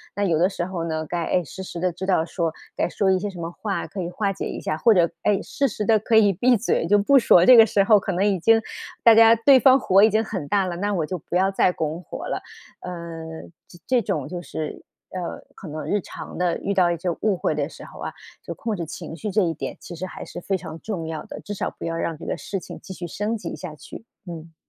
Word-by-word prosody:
那 205 - -1
有 165 -5 +2
的 180 +4 +3
时 175 - -3
候 180 -2 -4
呢， 160 -1 -2
该 175 +1 -2
哎， 180 - +1
时 190 +6 -8
时 175 - -7
地 185 +1 +1
知 185 +2 -5
道 180 -4 +2
说 165 -2 -2 0.2
该 - - 0
说 195 +2 0
一 190 - +4
些 205 +3 -3
什 185 -3 -10
么 165 0 -4
话 200 +2 -4
可 195 - -6
以 175 - -3
化 200 +2 -1
解 - - -5
一 - - -5
下， 155 - -2
或 225 +6 +5
者 170 -3 +3
哎， 205 -1 +2
适 275 -1 -1
时 210 0 -4
地 220 +1 +5
可 220 +1 +2
以 205 -2 +5
闭 240 +7 +3
嘴， 230 - 0
就 205 - +5
不 240 +8 +4
说， 180 -8 +6
这 255 - +9
个 225 - +9
时 205 -2 +2
候 210 +1 +6
可 195 - -2
能 185 +3 +1
已 200 -2 +2
经 225 +6 +4 0.4
大 230 -1 +8
家 225 0 +8
对 260 +4 +6
方 265 +1 +6
火 195 -4 +4
已 220 - +7
经 215 +1 +2
很 190 -8 -4
大 200 -2 +2
了， 180 -2 -3
那 205 +3 -1
我 165 -5 0
就 185 - -4
不 170 - -7
要 190 +1 +3
再 190 -1 +3
拱 160 +1 -4
火 - - -7
了。 - - -3 0.4
呃， 180 - -6 0.8
这 175 - -15
这 255 -2 +3
种 155 - -2
就 175 +3 -5
是 155 -2 -6 0.3
呃， 180 -2 -5
可 190 - -10
能 155 +1 -6
日 205 - 0
常 - - -9
地 180 -1 +1
遇 200 - -2
到 180 -3 +3
一 170 - -1
些 175 +2 -2
误 205 -4 +1
会 155 - -1
的 145 0 -1
时 - - -12
候 - - -13
啊， - - -4 0.3
就 - - -5
控 225 -2 -3
制 170 -3 -4
情 160 0 -8
绪 210 +4 -4
这 210 - +2
一 165 - 0
点 - - -6
其 175 - -9
实 185 +3 -5
还 - - -8
是 - - -8
非 195 +2 -1
常 160 -3 -8
重 180 -7 -4
要 160 -1 -5
的， - - -8
至 205 - -6
少 200 - -2
不 - - -5
要 165 0 -2
让 165 -1 -2
这 - - -10
个 - - -2
事 195 - -4
情 - - -10
继 190 - -8
续 175 -1 -6
升 210 +6 -2
级 - - -6
下 180 -4 -7
去， 155 - -11 0.2
嗯。 165 -1 -9
185 Hz, 295 characters per minute, -23 LUFS, 170-210 Hz, 0.8 s, 这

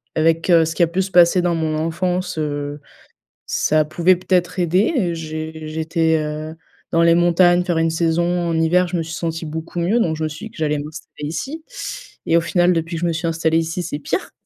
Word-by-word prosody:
avec, 165 +2 +1
heu, 165 -2 +6
ce 160 - -3
qui - - -1
a 170 - +4
pu 180 +3 -1
se 190 - -7
passer 175 0 +5
dans 175 -1 +1
mon 160 -1 -1
enfance, 180 +2 -2
heu, 145 -1 -3 0.7
ça 155 0 +2
pouvait 175 +4 +3
peut-être 180 0 0
aider. 180 - +1
J'ai 155 0 -6
j'étais, 160 +1 0
heu, 155 +1 -4 0.4
dans 170 0 +3
les 170 0 +5
montagnes, 175 +1 +4
faire 175 -2 0
une 165 0 +2
saison 165 +1 +1 0.3
en 165 - 0
hiver, 175 +3 +3
je 175 - -1
me 165 - -1
suis 160 - -7
sentie 165 -1 -3
beaucoup 160 +3 -5
mieux, 195 +8 +2
donc 160 -5 0
je 160 - -3
me - - +1
suis 155 +9 -8
dit - - -16
que - - -17
j'allais 150 -1 0
m'installer 150 0 -8
ici, 275 - -5 0.6
et 165 - +2
au - - +3
final, 175 +1 +2
depuis 165 +1 -2
que 165 - -5
je - - 0
me 170 - 0
suis 165 +2 -2
installée 165 0 +1
ici, 165 +2 -3
c'est 145 - -4
pire. 145 - -3
165 Hz, 225 wpm, -20 LUFS, 160-175 Hz, 0.7 s, heu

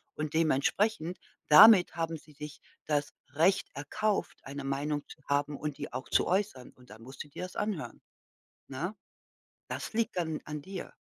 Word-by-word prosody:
und 155 0 -3
dementsprechend, 165 +4 +1 0.3
damit 190 +3 +9
haben 165 -1 -2
sie 150 +1 -18
sich 150 +1 -9 0.3
das 145 -1 0 0.2
Recht 170 +6 +3
erkauft, 200 +9 -1
eine 140 +1 -6
Meinung 145 +2 -1
zu 150 - -13
haben 145 +1 +1
und 150 -2 -4
die - - -6
auch 130 +2 -5
zu - - +3
äußern. 185 -9 -1
Und 125 -1 -21
dann 110 +1 -12
musst 130 +2 -8
du - - -17
dir 160 - -7
das 180 - -7
anhören, 180 - -3 0.7
ne? 165 +10 -4 0.7
Das - - -5
liegt 225 -4 0
dann 160 -3 -1
an 150 -1 -6
dir. 190 -1 -7
150 Hz, 170 wpm, -30 LUFS, 140-180 Hz, 0.7 s, damit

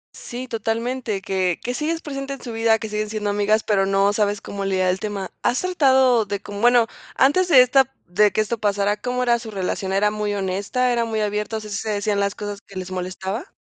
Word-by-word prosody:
Sí, 250 +2 -7
totalmente. 230 -1 -2
Que 185 -3 0
que 245 - -2
sigues 320 +4 -2
presente 275 -1 -5
en 275 - -9
su 235 - -7
vida, 225 0 +3
que 220 0 -6
siguen 210 0 -3
siendo 210 -1 -2
amigas, 210 +2 +2
pero 195 -2 +2
no 195 +1 +3
sabes 205 -1 0
cómo 200 0 -5
lidiar 190 -1 +1
el 190 - -3
tema, 200 -3 -4
¿has 245 - +1
tratado 265 -10 +3
de 200 0 -3
como?, 205 +1 -8
bueno, 240 -1 +5 0.3
antes 355 +8 +3
de 265 -7 +8
esta 265 +1 +3 0.2
de 205 +3 +4
que 215 - +1
esto 220 +1 -2
pasara, 205 0 +1
¿cómo 250 0 -1
era 235 -1 +3
su 230 -2 -8
relación? 190 -1 -3
¿Era 210 +2 +2
muy 210 -1 -2
honesta, 200 +6 0
era 235 -1 +1
muy 220 -1 -2
abierta?, 210 +1 -2
o - - -3
sea, 210 - -9
¿sí 200 - -2
se 220 - -4
decían 205 0 0
las 200 0 0
cosas 205 -1 -6
que 195 - -17
les 185 0 -5
molestaba? 190 - -5
210 Hz, 230 wpm, -22 LUFS, 200-245 Hz, 0.3 s, de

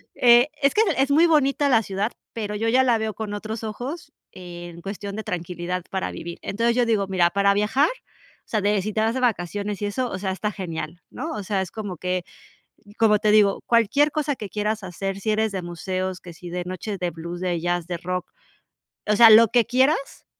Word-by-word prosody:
eh, 240 +2 +6
es 275 - +3
que 430 - +3 0.2
es 270 +1 +2
muy 325 +4 +5
bonita 285 -2 +2
la 225 -3 +4
ciudad, 200 +4 -2 0.2
pero, 210 -2 -4
yo 225 +2 -1
ya 260 +2 +4
la 240 -3 +3
veo 220 -1 -2
con 215 -2 -5
otros 215 +2 -5
ojos 260 +8 -6 0.2
en 175 -1 -10
cuestión 200 +1 -6
de 220 - -4
tranquilidad 180 0 -4
para 190 -1 -2
vivir. 170 0 -7
Entonces, 235 +3 0
yo 245 -1 +3
digo, 210 -4 +1
mira, 180 -2 +3
para 200 0 +3
viajar, 240 +8 +2
o - - -15
sea, 215 -2 0
de, 205 0 +2
si 210 +1 -4
te 215 - 0
vas 225 +1 +1
de 260 - -1
vacaciones 205 -3 -1
y - - 0
eso, 250 +4 -2
o 185 - -4
sea, 190 -1 -2
está 210 +2 -2
genial, 170 -3 -6
¿no? 320 - -5
O 210 - -4
sea, 195 -1 -1
es 185 - -5
como 205 -6 -6
que, 180 0 -2 0.7
como 210 -2 +4
te 215 0 +2
digo, 205 -2 +4
cualquier 235 +6 +3
cosa 295 -2 -1
que 210 -4 -7
quieras 210 +1 -2
hacer, 195 +2 -4
si 215 +2 -1
eres 220 0 +1
de 190 -2 -3
museos, 185 +2 -4
que 175 -2 -10
si 175 0 -10
de 180 +1 -3
noches 185 +2 -5
de 175 -1 -1
blues, 170 +2 -7
de 175 -2 -1
jazz, 175 0 -1
de 175 -1 -3
rock. 180 +1 -4 0.8
O 210 - +3
sea, 230 +1 +9
lo 225 +1 +8
que 240 -1 +3
quieras, 270 +4 +1
205 Hz, 220 wpm, -23 LUFS, 180-230 Hz, 0.8 s, sea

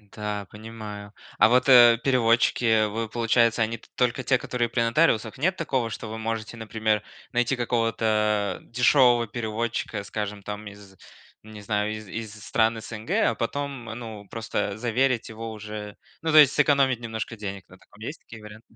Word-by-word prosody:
Да, 105 -1 -4
понимаю. 105 -2 -9 0.3
А, 110 - +7
вот, 125 +3 +3
э, 120 -2 +8
переводчики, 120 -2 +2
э, 110 -1 +4
вы, 110 +1 -4
получается, 115 0 +2
они 115 +1 -2
т - - -21
только 125 +1 0
те, 130 0 +3
которые 120 -1 -2
при 120 +1 0
нотариусах? 115 -2 +2
Нет 185 +6 +1
такого, 130 -9 -1
что 110 0 -6
вы 110 +1 -6
можете, 110 0 -4
например, 110 -1 -1 0.3
найти 120 +1 +1
какого-то, 110 -3 0
э, - - -22
дешевого 125 -1 +4
переводчика, 110 -1 -3
скажем, 105 0 -5
там, 105 +1 -6
из, 100 -1 -13 0.5
не 110 -1 -11
знаю, 105 +1 -1
из 110 -1 -8
из 110 +2 -6
стран 115 0 +1
СНГ, 110 0 -9 0.2
а - - -5
потом, 135 +2 -4
ну, 110 -2 -8
просто 110 -3 -3
заверить 120 +1 0
его 115 0 -7
уже, 105 -1 -7 0.3
ну, 160 - -1
то 155 - +5
есть 145 -2 +8
сэкономить 140 -4 +3
немножко 115 -1 -5
денег, 100 -2 -6
вот 95 - -17
так - - -24
вот. 105 +1 -13
Есть 145 +7 -6
такие 110 -1 -13
варианты? 105 +1 -11
115 Hz, 175 wpm, -25 LUFS, 105-120 Hz, 0.5 s, э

